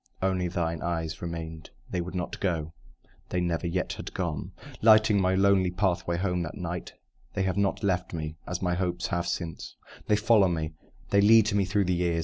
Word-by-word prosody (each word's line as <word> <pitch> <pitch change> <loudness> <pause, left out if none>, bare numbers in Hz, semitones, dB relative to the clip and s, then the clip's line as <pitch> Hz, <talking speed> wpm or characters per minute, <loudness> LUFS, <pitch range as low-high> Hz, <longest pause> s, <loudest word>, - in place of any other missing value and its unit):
Only 95 -1 0
thine 85 -2 -2
eyes 80 -2 -3
remained; 80 -2 -6 0.2
They 90 - 0
would 90 +2 -6
not 90 -2 -3
go 80 -4 -1 0.6
they 90 - 0
never 85 0 -1
yet 90 +2 -1
have - - -8
gone; 85 -5 -3 0.3
Lighting 110 -2 +6
my 95 0 +2
lonely 95 -1 +4
pathway 90 -2 0
home 90 -1 0
that 80 - -5
night, 90 -2 -5 0.4
They 95 - +1
have 95 -1 0
not 100 +1 0
left 90 -2 0
me 80 -2 -4
(as 90 +1 -3
my 90 -1 +1
hopes 90 -1 -1
have) 85 0 -1
since; 80 -5 -4 0.3
They 105 - +4
follow 105 -1 +4
me 80 -3 -2 0.4
they 100 - +5
lead 110 +1 +6
me 100 -1 +2
through 100 +1 +1
the 90 - +1
years. 85 -1 +1
90 Hz, 190 wpm, -28 LUFS, 85-95 Hz, 0.6 s, Lighting